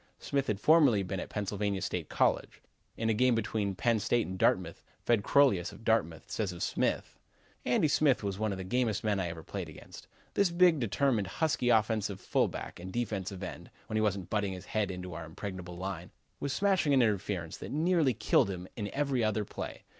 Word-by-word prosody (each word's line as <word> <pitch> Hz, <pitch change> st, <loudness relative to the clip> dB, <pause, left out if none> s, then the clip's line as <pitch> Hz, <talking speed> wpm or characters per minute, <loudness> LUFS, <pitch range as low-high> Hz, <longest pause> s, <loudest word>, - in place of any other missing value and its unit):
Smith 140 Hz, -1 st, -1 dB
had 105 Hz, -2 st, -1 dB
formerly 140 Hz, -7 st, +5 dB
been 95 Hz, 0 st, -3 dB
at -, -, -6 dB
Pennsylvania 100 Hz, -1 st, -2 dB
State -, -, -3 dB
College. -, -, +1 dB, 0.4 s
In 115 Hz, -, -1 dB
a 110 Hz, -, +3 dB
game 125 Hz, +2 st, +3 dB
between 105 Hz, -3 st, -1 dB
Penn' 115 Hz, +3 st, +2 dB
State 120 Hz, +3 st, +1 dB
and 95 Hz, -, -5 dB
Dartmouth, 90 Hz, -2 st, +1 dB, 0.2 s
Fred 115 Hz, -3 st, +3 dB
Crolius, 125 Hz, -12 st, +3 dB
of -, -, -13 dB
Dartmouth, 85 Hz, -9 st, 0 dB
says 105 Hz, -4 st, -1 dB
of 85 Hz, -, -5 dB
Smith: -, -, -1 dB, 0.5 s
"Andy 125 Hz, +5 st, +3 dB
Smith 145 Hz, -4 st, +3 dB
was 100 Hz, -1 st, -3 dB
one 110 Hz, -1 st, 0 dB
of 95 Hz, -, -3 dB
the 95 Hz, -, -5 dB
gamest 110 Hz, +1 st, 0 dB
men 105 Hz, -2 st, +1 dB
I 90 Hz, -, -1 dB
ever 85 Hz, -1 st, -7 dB
played -, -, -5 dB
against. -, -, -12 dB, 0.3 s
This 200 Hz, -2 st, +3 dB
big, 170 Hz, -2 st, +4 dB
determined, 115 Hz, -1 st, +1 dB
husky 125 Hz, -, 0 dB
offensive 110 Hz, -3 st, +2 dB
fullback -, -, -1 dB
and 90 Hz, +2 st, -7 dB
defensive 100 Hz, -4 st, -3 dB
end, 90 Hz, -, -7 dB, 0.2 s
when 110 Hz, -, -5 dB
he 110 Hz, -, +2 dB
wasn't 100 Hz, -4 st, -1 dB
butting 105 Hz, -3 st, 0 dB
his 90 Hz, 0 st, -8 dB
head 105 Hz, 0 st, -1 dB
into 90 Hz, -1 st, -6 dB
our 85 Hz, +1 st, -6 dB
impregnable 90 Hz, +1 st, -7 dB
line, 90 Hz, -1 st, -5 dB, 0.3 s
was 140 Hz, -, -2 dB
smashing 190 Hz, -5 st, +2 dB
an 130 Hz, -, +5 dB
interference 100 Hz, -6 st, -1 dB
that -, -, -8 dB
nearly 155 Hz, -4 st, +2 dB
killed 105 Hz, -2 st, +3 dB
him 90 Hz, -1 st, -5 dB
in 105 Hz, -2 st, -3 dB
every 140 Hz, -4 st, +1 dB
other 110 Hz, -1 st, 0 dB
play. -, -, -7 dB
105 Hz, 200 wpm, -31 LUFS, 95-125 Hz, 0.5 s, formerly